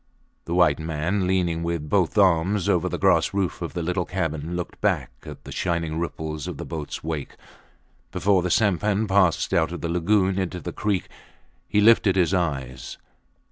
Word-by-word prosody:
The 85 Hz, -, -2 dB
white 85 Hz, -5 st, +4 dB
man, 80 Hz, +5 st, -1 dB
leaning 90 Hz, -3 st, 0 dB
with 85 Hz, -3 st, -3 dB
both 90 Hz, +3 st, +1 dB
arms 95 Hz, 0 st, +3 dB
over -, -, +2 dB
the -, -, -3 dB
grass -, -, +2 dB
roof 95 Hz, -3 st, -1 dB
of 85 Hz, -, -4 dB
the 85 Hz, -, -2 dB
little 90 Hz, +1 st, -1 dB
cabin, 80 Hz, -2 st, -3 dB
looked 90 Hz, -1 st, -6 dB
back -, -, 0 dB, 0.2 s
at -, -, -9 dB
the -, -, -10 dB
shining 85 Hz, -3 st, -2 dB
ripple 80 Hz, -1 st, -4 dB
of 75 Hz, -2 st, -6 dB
the -, -, -6 dB
boats 80 Hz, -3 st, -6 dB
wake. 80 Hz, -3 st, -4 dB, 0.8 s
Before 100 Hz, -1 st, +2 dB
the 90 Hz, -, -2 dB
sampan 105 Hz, +2 st, +2 dB
passed 95 Hz, -4 st, +2 dB
out 80 Hz, 0 st, +2 dB
of 85 Hz, -, -6 dB
the 85 Hz, -, -3 dB
lagoon 95 Hz, +2 st, +2 dB
into 90 Hz, -1 st, -3 dB
the 80 Hz, -, -6 dB
creek 100 Hz, -4 st, -1 dB, 0.6 s
he 105 Hz, -, +2 dB
lifted 105 Hz, -3 st, +5 dB
his 90 Hz, -1 st, +2 dB
eyes. 65 Hz, -8 st, -3 dB
85 Hz, 180 wpm, -24 LUFS, 80-95 Hz, 0.8 s, lifted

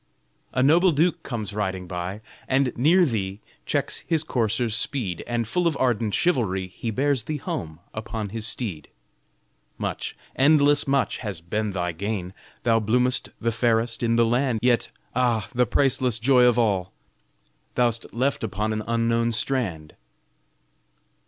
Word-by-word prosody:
A 130 Hz, -, +1 dB
noble 170 Hz, +6 st, +5 dB
duke 165 Hz, +3 st, +1 dB
comes 110 Hz, -5 st, -5 dB
riding 95 Hz, -3 st, -2 dB
by, 90 Hz, +3 st, -5 dB, 0.3 s
And 135 Hz, -1 st, +1 dB
near 170 Hz, +9 st, +4 dB
thee 100 Hz, -7 st, -2 dB, 0.3 s
checks -, -, -1 dB
his 160 Hz, -2 st, +1 dB
courser's 115 Hz, -4 st, 0 dB
speed, 110 Hz, -9 st, -2 dB
And 120 Hz, -2 st, -1 dB
full 175 Hz, +8 st, +1 dB
of 160 Hz, -4 st, 0 dB
ardent 115 Hz, -5 st, +1 dB
chivalry 110 Hz, -, +1 dB
He 115 Hz, +5 st, -5 dB
bears 130 Hz, +1 st, 0 dB
thee 155 Hz, +2 st, -2 dB
home 80 Hz, -, -5 dB
upon 110 Hz, -1 st, -4 dB
his 110 Hz, +1 st, -2 dB
steed. 90 Hz, -, -2 dB, 0.9 s
Much, -, -, -4 dB, 0.2 s
endless 145 Hz, +1 st, +4 dB
much, 135 Hz, -1 st, +1 dB
has 105 Hz, -7 st, -5 dB
been 105 Hz, +5 st, -2 dB
thy 90 Hz, -2 st, -1 dB
gain! 95 Hz, +1 st, -4 dB, 0.3 s
Thou 115 Hz, -2 st, +3 dB
bloom'st 125 Hz, +4 st, +1 dB
the 115 Hz, 0 st, 0 dB
fairest 115 Hz, 0 st, +1 dB
in 115 Hz, -1 st, +2 dB
the 115 Hz, 0 st, +4 dB
land! 120 Hz, +1 st, +1 dB
Yet 125 Hz, -1 st, +2 dB, 0.3 s
ah! 120 Hz, -5 st, +1 dB
the 125 Hz, 0 st, +2 dB
priceless 130 Hz, -2 st, +2 dB
joy 125 Hz, +2 st, +4 dB
of 120 Hz, -1 st, +4 dB
all, 95 Hz, -5 st, +1 dB, 0.8 s
Thou'st 120 Hz, -2 st, +1 dB
left 130 Hz, +3 st, 0 dB
upon 105 Hz, +1 st, -1 dB
an 110 Hz, -, -2 dB
unknown 115 Hz, 0 st, +1 dB
strand. 100 Hz, -, -2 dB
115 Hz, 145 wpm, -24 LUFS, 105-130 Hz, 0.9 s, noble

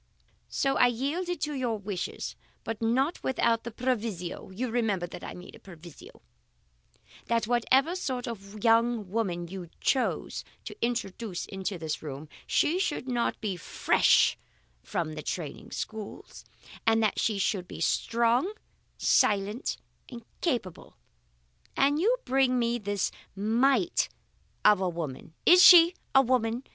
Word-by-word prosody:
So 270 Hz, 0 st, 0 dB
I 245 Hz, -, +6 dB
yielded 305 Hz, +9 st, -2 dB
to 300 Hz, -, -1 dB
your 245 Hz, -5 st, -1 dB
wishes, 200 Hz, -3 st, -5 dB, 0.3 s
but 225 Hz, -1 st, -5 dB
not 260 Hz, +8 st, +1 dB
without 235 Hz, -3 st, +1 dB
the 235 Hz, -, -5 dB
proviso 220 Hz, -9 st, -3 dB
(you 230 Hz, +6 st, -4 dB
remember 215 Hz, -7 st, 0 dB
that 175 Hz, -, -10 dB
I -, -, -7 dB
made 180 Hz, +1 st, -11 dB
a -, -, -13 dB
proviso) 170 Hz, -4 st, -14 dB, 1.0 s
that 230 Hz, -1 st, +1 dB
whatever 260 Hz, +8 st, +2 dB
sort 260 Hz, -8 st, -3 dB
of 205 Hz, -2 st, -8 dB
young 230 Hz, -3 st, +2 dB
woman 180 Hz, -6 st, -1 dB
you 180 Hz, -1 st, -8 dB
chose 260 Hz, -2 st, 0 dB, 0.2 s
to -, -, -7 dB
introduce 225 Hz, -5 st, -3 dB
into 190 Hz, 0 st, -4 dB
this 160 Hz, -2 st, -4 dB
room, 145 Hz, 0 st, -7 dB, 0.2 s
she 340 Hz, +5 st, +2 dB
should 355 Hz, -8 st, -2 dB
not 240 Hz, -2 st, -1 dB
be 205 Hz, -4 st, -2 dB
fresh 175 Hz, -, +3 dB, 0.4 s
from 170 Hz, -6 st, -3 dB
the 155 Hz, -, -6 dB
training 155 Hz, 0 st, -5 dB
schools, 215 Hz, -2 st, -7 dB, 0.4 s
and 225 Hz, 0 st, +4 dB
that 215 Hz, -, +1 dB
she 215 Hz, -3 st, +1 dB
should 190 Hz, -2 st, -1 dB
be -, -, -9 dB
strong, 235 Hz, -, +1 dB, 0.5 s
silent, 205 Hz, +5 st, +1 dB, 0.3 s
and 235 Hz, -3 st, -10 dB, 0.2 s
capable. 240 Hz, -, -3 dB, 0.8 s
And 285 Hz, +2 st, +3 dB
you 460 Hz, +8 st, +3 dB
bring 260 Hz, -1 st, +2 dB
me 235 Hz, 0 st, 0 dB
this 205 Hz, -2 st, -1 dB, 0.2 s
mite 250 Hz, -, +2 dB, 0.6 s
of 210 Hz, -2 st, +6 dB
a 185 Hz, -, +1 dB
woman 160 Hz, -2 st, -6 dB
is 360 Hz, +1 st, +8 dB
she 345 Hz, -1 st, +9 dB, 0.2 s
a 270 Hz, -, +8 dB
woman? 240 Hz, -1 st, 0 dB
230 Hz, 140 wpm, -28 LUFS, 195-255 Hz, 1.0 s, she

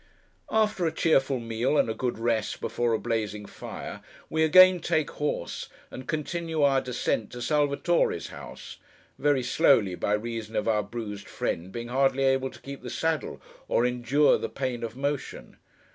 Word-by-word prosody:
After 210 Hz, -5 st, +2 dB
a -, -, 0 dB
cheerful 135 Hz, -5 st, +2 dB
meal, 115 Hz, +5 st, 0 dB
and -, -, +3 dB
a 110 Hz, -, -1 dB
good 120 Hz, +1 st, -2 dB
rest 115 Hz, -1 st, -1 dB
before 120 Hz, -1 st, -1 dB
a -, -, +3 dB
blazing 105 Hz, -1 st, -2 dB
fire, -, -, -8 dB, 0.3 s
we 160 Hz, -, +1 dB
again 185 Hz, +3 st, +7 dB
take 160 Hz, -2 st, 0 dB
horse, 145 Hz, -12 st, -3 dB, 0.2 s
and 130 Hz, -, -8 dB
continue 160 Hz, 0 st, -2 dB
our 135 Hz, -1 st, +4 dB
descent 120 Hz, -3 st, -2 dB
to 120 Hz, -, -6 dB
Salvatore's 150 Hz, +5 st, +1 dB
house—very 145 Hz, -3 st, -4 dB
slowly, 110 Hz, -7 st, +4 dB
by 100 Hz, +3 st, -1 dB
reason 110 Hz, 0 st, -3 dB
of 105 Hz, -, 0 dB
our 110 Hz, -2 st, +3 dB
bruised 105 Hz, -2 st, -6 dB
friend 85 Hz, +3 st, -3 dB
being 120 Hz, +2 st, -6 dB
hardly 135 Hz, +1 st, +2 dB
able 135 Hz, 0 st, +2 dB
to -, -, -15 dB
keep 140 Hz, 0 st, -8 dB
the 125 Hz, -, -7 dB
saddle, 160 Hz, +2 st, -2 dB, 0.3 s
or 120 Hz, -, +2 dB
endure 125 Hz, +4 st, +3 dB
the -, -, -3 dB
pain 130 Hz, -3 st, -3 dB
of 115 Hz, 0 st, -5 dB
motion. 140 Hz, 0 st, -4 dB
130 Hz, 160 wpm, -27 LUFS, 115-150 Hz, 0.3 s, again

